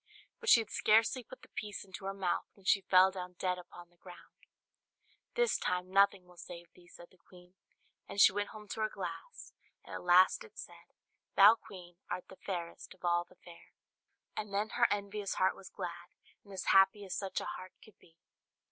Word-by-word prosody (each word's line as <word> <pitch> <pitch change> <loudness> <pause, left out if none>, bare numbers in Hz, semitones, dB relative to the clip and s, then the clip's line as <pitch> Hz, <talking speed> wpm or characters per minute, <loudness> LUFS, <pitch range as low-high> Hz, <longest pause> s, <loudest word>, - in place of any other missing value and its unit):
But 460 -2 -2
she 235 - +8
had 220 - -9
scarcely 225 +4 +3
put 260 - -14
the - - -14
piece 205 -1 -6
into 190 0 -10
her 195 - -2
mouth, 190 -3 -1
when 195 - -22
she 195 - +4
fell 185 0 +5
down 180 -1 -7
dead 180 +1 -2
upon 175 0 -13
the 175 - -30
ground. 175 0 -16 0.9
"This 485 -2 +2
time 180 0 -2
nothing 195 -1 +4
will 180 0 -19
save 170 0 -10
thee," 175 -1 -20
said 175 0 -15
the 185 - -25
queen; 180 0 -18 0.6
and 200 - -5
she 200 - +8
went 205 +1 -2
home 210 -1 -11
to 220 - -4
her 215 - +1
glass, - - -8 0.3
and - - -10
at - - -5
last 180 - +5
it 450 - -17
said, - - -12 0.4
"Thou, 200 +3 +9
Queen, 180 -6 -12
art 180 - -5
the 190 - -13
fairest 175 -2 -6
of 180 - -11
all 175 0 +2
the - - -22
fair." 170 -1 -15 0.6
And 210 -1 -5
then 205 +2 -1
her 240 -1 +3
envious 200 0 -3
heart 185 0 +2
was 190 - -12
glad, 175 -2 -7 0.3
and 200 - -16
as 190 - -5
happy 195 +1 +5
as 185 -1 -5
such 195 0 -3
a - - -6
heart 185 0 -7
could 215 - -20
be. 165 - -23
190 Hz, 205 wpm, -33 LUFS, 180-205 Hz, 0.9 s, Thou